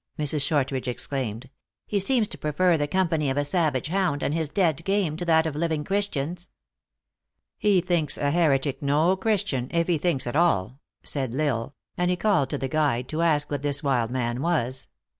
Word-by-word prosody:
Mrs. 150 Hz, -1 st, +1 dB
Shortridge 135 Hz, -3 st, 0 dB
exclaimed. 125 Hz, -1 st, -4 dB, 0.2 s
" -, -, -67 dB
He 205 Hz, -, 0 dB
seems 230 Hz, +2 st, +3 dB
to -, -, -5 dB
prefer 170 Hz, +4 st, +2 dB
the 145 Hz, -2 st, 0 dB
company 160 Hz, -4 st, +1 dB
of 135 Hz, -, -2 dB
a 145 Hz, -, +1 dB
savage 150 Hz, -3 st, 0 dB
hound, 180 Hz, -6 st, 0 dB
and 145 Hz, -, 0 dB
his 160 Hz, -2 st, -1 dB
dead 165 Hz, -3 st, +1 dB
game, 195 Hz, -5 st, 0 dB
to 175 Hz, -, -4 dB
that 160 Hz, -1 st, +4 dB
of 155 Hz, -2 st, -3 dB
living 160 Hz, -1 st, -1 dB
Christians." 180 Hz, -3 st, -2 dB, 0.5 s
" -, -, -61 dB, 0.3 s
He 200 Hz, -3 st, +3 dB
thinks 170 Hz, -5 st, 0 dB
a 145 Hz, 0 st, 0 dB
heretic 145 Hz, -4 st, +1 dB
no 150 Hz, +6 st, +2 dB
Christian, 190 Hz, -, -1 dB
if 170 Hz, 0 st, 0 dB
he 170 Hz, -4 st, +1 dB
thinks 165 Hz, -5 st, 0 dB
at 120 Hz, -, -4 dB
all," 135 Hz, -, +1 dB, 0.2 s
said 130 Hz, -4 st, -2 dB
L -, -, -2 dB
Isle; 135 Hz, -2 st, -1 dB, 0.2 s
and 180 Hz, 0 st, +2 dB
he 180 Hz, -, +1 dB
called 185 Hz, -9 st, +2 dB
to 145 Hz, -, -2 dB
the 135 Hz, -, -3 dB
guide, 130 Hz, -4 st, 0 dB
to 155 Hz, +1 st, -2 dB
ask 150 Hz, -3 st, +1 dB
what 145 Hz, -2 st, -2 dB
this 145 Hz, +1 st, -1 dB
wild 125 Hz, -5 st, +1 dB
man 120 Hz, -1 st, -2 dB
was. 135 Hz, -6 st, -1 dB
150 Hz, 200 wpm, -25 LUFS, 135-175 Hz, 0.5 s, that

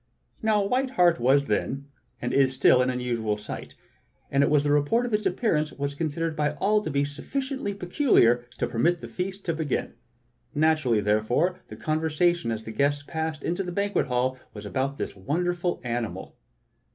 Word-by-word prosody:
Now 215 Hz, -2 st, +2 dB
a -, -, -2 dB
white 260 Hz, +5 st, +1 dB
hart 175 Hz, -, +3 dB
was 135 Hz, +4 st, +4 dB
then, 135 Hz, +4 st, -2 dB, 0.3 s
and 120 Hz, -, -3 dB
is 135 Hz, -1 st, +3 dB
still, 130 Hz, -1 st, +5 dB
an 125 Hz, -, +2 dB
unusual 120 Hz, -4 st, -1 dB
sight; 105 Hz, -, -8 dB, 0.6 s
and 140 Hz, -, +3 dB
the 145 Hz, 0 st, +3 dB
report 150 Hz, +12 st, +2 dB
of 240 Hz, -, -4 dB
its 210 Hz, -1 st, +2 dB
appearance 170 Hz, -6 st, 0 dB
was 140 Hz, 0 st, -3 dB
considered 160 Hz, +2 st, -2 dB
by 150 Hz, -1 st, 0 dB
all 210 Hz, +7 st, +2 dB
to -, -, -4 dB
be 140 Hz, 0 st, +1 dB
sufficiently 265 Hz, -, -4 dB
peculiar 175 Hz, -, +3 dB
to -, -, 0 dB
permit 165 Hz, +9 st, +1 dB
the -, -, -6 dB
feast 190 Hz, +2 st, -5 dB
to 170 Hz, -, 0 dB
begin. 155 Hz, -3 st, -2 dB, 0.6 s
Naturally, 150 Hz, -7 st, +3 dB
therefore, 120 Hz, -, +1 dB
the -, -, -9 dB
con 155 Hz, 0 st, -1 dB
versation 160 Hz, -3 st, +1 dB
as 110 Hz, -1 st, -3 dB
the 110 Hz, -, -7 dB
guests 145 Hz, +3 st, +1 dB
passed 160 Hz, -1 st, -3 dB
into 175 Hz, +3 st, -1 dB
the 180 Hz, -2 st, -4 dB
banquet 200 Hz, +3 st, 0 dB
hall 130 Hz, 0 st, 0 dB, 0.2 s
was 105 Hz, 0 st, -8 dB
about 135 Hz, +6 st, -2 dB
this -, -, -4 dB
wonderful 175 Hz, -, -1 dB
animal. 120 Hz, -2 st, -4 dB
150 Hz, 175 wpm, -26 LUFS, 130-180 Hz, 0.6 s, still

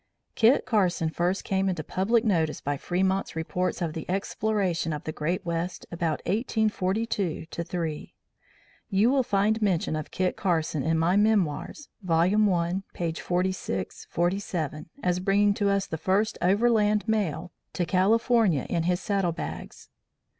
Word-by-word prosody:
"Kit 235 Hz, +4 st, +4 dB
Carson 180 Hz, -7 st, +1 dB
first 175 Hz, +4 st, -1 dB
came 195 Hz, 0 st, 0 dB
into 175 Hz, -4 st, -2 dB
public 220 Hz, +8 st, +1 dB
notice 165 Hz, -7 st, +1 dB
by 145 Hz, +1 st, -2 dB
Fremont's 190 Hz, +5 st, -1 dB
Reports 180 Hz, +3 st, -2 dB
of 160 Hz, -2 st, -2 dB
the 160 Hz, -, -7 dB
Exploration 195 Hz, -3 st, -1 dB
of 150 Hz, -, -5 dB
the 155 Hz, -, -4 dB
Great 165 Hz, +4 st, -2 dB
West 170 Hz, +1 st, -3 dB
about 165 Hz, -2 st, -1 dB
1842 210 Hz, -3 st, -1 dB
3. 165 Hz, -2 st, -4 dB, 0.8 s
You 210 Hz, +4 st, +3 dB
will 275 Hz, -1 st, +3 dB
find 215 Hz, -1 st, +1 dB
mention 180 Hz, -6 st, +1 dB
of 155 Hz, -1 st, -4 dB
Kit 185 Hz, -1 st, -1 dB
Carson 165 Hz, -5 st, 0 dB
in 160 Hz, +4 st, +1 dB
my 170 Hz, +3 st, +2 dB
memoirs, 210 Hz, -, +1 dB
vol. 165 Hz, -4 st, +1 dB, 0.3 s
I, 175 Hz, +2 st, 0 dB
p. 170 Hz, -2 st, -2 dB
46, 175 Hz, -, -2 dB
47, 175 Hz, -4 st, -2 dB
as 180 Hz, 0 st, +1 dB
bringing 200 Hz, +2 st, +3 dB
to 200 Hz, 0 st, 0 dB
us 200 Hz, -1 st, +1 dB
the 160 Hz, -, -5 dB
first 200 Hz, +5 st, +1 dB
overland 210 Hz, +2 st, +3 dB
mail 180 Hz, -6 st, -1 dB, 0.2 s
to 175 Hz, -, -1 dB
California 200 Hz, -, +3 dB
in 170 Hz, -, +1 dB
his 175 Hz, +2 st, +1 dB
saddle 195 Hz, -4 st, 0 dB
bags. 170 Hz, -, -7 dB
185 Hz, 145 wpm, -27 LUFS, 165-205 Hz, 0.8 s, Kit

